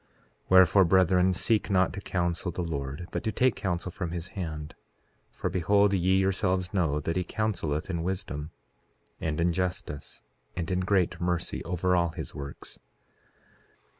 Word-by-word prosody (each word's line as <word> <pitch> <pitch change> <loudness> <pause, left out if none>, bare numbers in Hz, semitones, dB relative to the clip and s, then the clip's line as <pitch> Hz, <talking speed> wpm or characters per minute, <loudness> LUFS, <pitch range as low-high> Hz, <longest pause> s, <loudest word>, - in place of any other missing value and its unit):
4:10 - - -38 0.4
Wherefore, 95 +1 +7
brethren, 90 +1 +4
seek 105 +5 +1
not 95 -2 +3
to 100 - -6
counsel 85 -1 -1
the 90 - -3
Lord, 70 0 -4
but - - -3
to 110 - 0
take 125 +3 +3
counsel 95 -2 -3
from 90 -1 -4
his 85 +1 -5
hand. 80 -7 -5 0.6
For - - -4
behold, 100 +3 +3
ye 95 0 +3
yourselves 95 0 +1
know 80 -7 +1
that 80 +3 -2
he 90 - +1
counseleth 85 -7 -2
in 85 -3 -2
wisdom, 85 -5 -3 0.7
and 80 -1 -2
in 85 +1 +3
justice, 90 -4 -4 0.3
and 85 0 -3
in 90 - +1
great 95 -2 +1
mercy, 90 -1 -1
over 90 +1 +1
all 85 -1 +2
his - - -6
works. 70 0 -8
90 Hz, 160 wpm, -28 LUFS, 85-95 Hz, 0.7 s, Wherefore